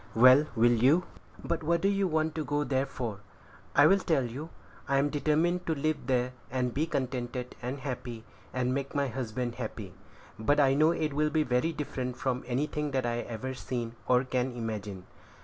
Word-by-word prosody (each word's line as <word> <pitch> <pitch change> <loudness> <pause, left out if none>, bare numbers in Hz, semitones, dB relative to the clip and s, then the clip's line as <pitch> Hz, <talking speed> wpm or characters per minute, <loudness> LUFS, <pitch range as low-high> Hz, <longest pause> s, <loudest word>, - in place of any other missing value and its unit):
"Well, 130 +6 +7
will 120 +1 +5
you?" 135 +10 +4 0.4
"But 170 - -1
what 170 +2 +1
do 195 - +3
you 200 -1 +2
want 160 -1 0
to 155 - -2
go 145 +1 0
there 135 -1 0
for?" 120 -7 -5 0.6
"I'll 155 +8 +6
tell 160 -7 +1
you. 135 +7 -6 0.4
I'm 140 +1 +2
determined 160 +4 +1
to 160 - +1
live 145 -2 -1
there, 125 -1 +1 0.2
and 125 -1 -1
be 155 +4 0
contented 125 -4 -3
and 130 +3 -4
happy, 125 -4 -5 0.3
and 125 0 0
make 140 +1 -3
my 140 -1 +1
husband 120 0 -3
happy; 105 -4 -6 0.5
but 145 +7 +2
I 135 -2 +5
know 155 +3 +5
it 155 -3 0
will 150 +1 +2
be 155 0 +2
very 125 +4 +1
different 130 -5 -4
from 130 -1 -1
anything 150 +4 -1
that 130 -2 -1
I 120 0 0
have 120 - -4
ever 120 +3 -4
seen, 120 -3 -4
or 125 0 +4
can 130 0 -1
imagine." 105 -5 -5
130 Hz, 185 wpm, -29 LUFS, 125-150 Hz, 0.6 s, Well